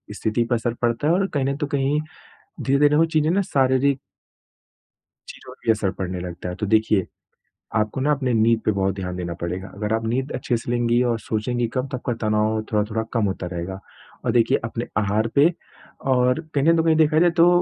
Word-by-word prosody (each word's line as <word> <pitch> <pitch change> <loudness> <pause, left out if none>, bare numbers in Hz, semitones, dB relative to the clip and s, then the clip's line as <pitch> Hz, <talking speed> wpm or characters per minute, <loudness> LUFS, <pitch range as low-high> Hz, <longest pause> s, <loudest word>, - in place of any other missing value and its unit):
स्थिति 110 +2 0
पर 120 - +3
असर 115 0 -1
पड़ता 120 +4 0
है 165 - +4
और 195 +2 +2
कहीं 140 -3 0
नहीं 140 +1 0
तो 145 - 0
कहीं 140 0 0 0.6
धीरे-धीरे 145 +2 +3
वो 165 - +5
चीज़ें 155 -1 +1
ना 195 +3 +2
शारीरिक 135 -1 +2 1.3
चीज़ों - - -11
भी 115 - +5
असर 105 -3 0
पड़ने 90 -1 -4
लगता 90 0 -6
है। 90 - -5
तो 105 - -3
देखिए, 110 -2 +2 0.7
आपको 110 +4 0
ना 145 +3 +1
अपनी 130 -3 0
नींद 115 0 +3
पे 110 - +2
बहुत 95 -1 0
ध्यान 90 -2 -5
देना 85 -1 -4
पड़ेगा। 90 +3 -4
अगर 105 +1 -3
आप 115 0 -1
नींद 130 +4 -1
अच्छे 125 -1 -1
से 115 - -6
लेंगी 120 0 +2
और 120 -2 0
सोचेंगी 120 +3 -1
कम 130 +1 0
तो 130 - -4
आपका 125 -1 -3
तनाव 110 +1 +1
थोड़ा-थोड़ा 105 +1 0
कम 115 -3 +1
होता 95 -2 -3
रहेगा 90 +3 -5 0.4
और - - +1
देखिए, 120 -2 +3
अपने 115 0 -4
आहार 105 +2 +1
पे 150 +5 +5 0.5
और 125 +2 +3
कहीं 140 -1 +2
ना 165 - +6
तो 165 - +3
कहीं 160 -1 +4
देखा 155 0 +4
जाए 175 0 +5
तो 170 +1 +7
120 Hz, 210 wpm, -23 LUFS, 105-140 Hz, 1.3 s, तो